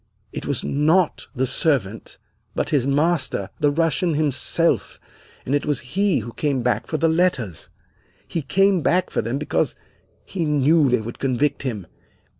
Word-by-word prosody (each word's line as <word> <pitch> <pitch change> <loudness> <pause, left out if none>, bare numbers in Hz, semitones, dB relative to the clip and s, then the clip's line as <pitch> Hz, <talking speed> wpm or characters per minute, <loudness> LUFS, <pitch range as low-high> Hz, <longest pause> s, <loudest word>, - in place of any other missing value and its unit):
It - - -6
was 140 -3 -2
not 155 +5 +1
the 130 +1 +1
servant, 115 -7 -1 0.4
but - - -1
his 140 -3 +2
master, 140 - 0
the 145 - +3
Russian 165 +2 +1
himself, 155 +3 +1 0.5
and 130 - -2
it 145 - +1
was 145 -3 0
he 195 - +2
who 120 - -8
came 140 -5 -1
back 120 -4 0
for 155 - -2
the 165 - +2
letters! 160 - 0 0.6
He 165 - -2
came 195 +5 +2
back 180 +4 +1
for - - 0
them 115 +5 -2
because 80 - -1 0.5
he 185 -3 -3
knew 150 0 +3
they 125 -2 +2
would 115 +2 -8
convict 135 +2 0
him. 110 -9 -4
145 Hz, 160 wpm, -22 LUFS, 125-165 Hz, 0.6 s, the